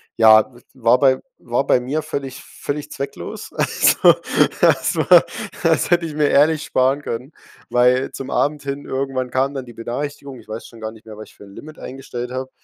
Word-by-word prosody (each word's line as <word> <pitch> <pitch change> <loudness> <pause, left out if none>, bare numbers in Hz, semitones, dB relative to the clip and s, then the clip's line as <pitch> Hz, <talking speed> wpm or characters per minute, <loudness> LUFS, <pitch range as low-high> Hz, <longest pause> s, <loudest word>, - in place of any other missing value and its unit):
Ja, 110 +1 +6
w 120 - -16 0.2
war 120 -1 +3
bei 130 -2 +4 0.2
war 120 +3 -1
bei - - +3
mir 140 +5 -3
völlig 135 -2 -6
völlig 145 +1 -6
zwecklos. 140 0 -7
Also, - - +4 0.5
das - - +3
war - - +6 0.4
das - - +2
hätte 175 -1 +3
ich 155 - -6
mir 150 0 +2
ehrlich 150 +2 +3
sparen 130 +3 +1
können, 125 +2 -5 0.4
weil 125 +2 +3
zum 135 - -7
Abend 145 0 0
hin 140 0 -5
irgendwann 130 -2 -3
kam 135 +2 0
dann 130 - -5
die 120 - -12
Benachrichtigung. 135 +3 -6
Ich - - -18
weiß 110 +1 -7
schon 115 - -15
gar 110 - -4
nicht 110 0 -17
mehr, 110 -1 -10
was 110 - -10
ich - - -22
für - - -14
'n 100 0 -15
Limit 155 +1 -11
eingestellt 125 -2 -7
habe. 130 +1 -5
130 Hz, 200 wpm, -20 LUFS, 120-140 Hz, 0.5 s, Ja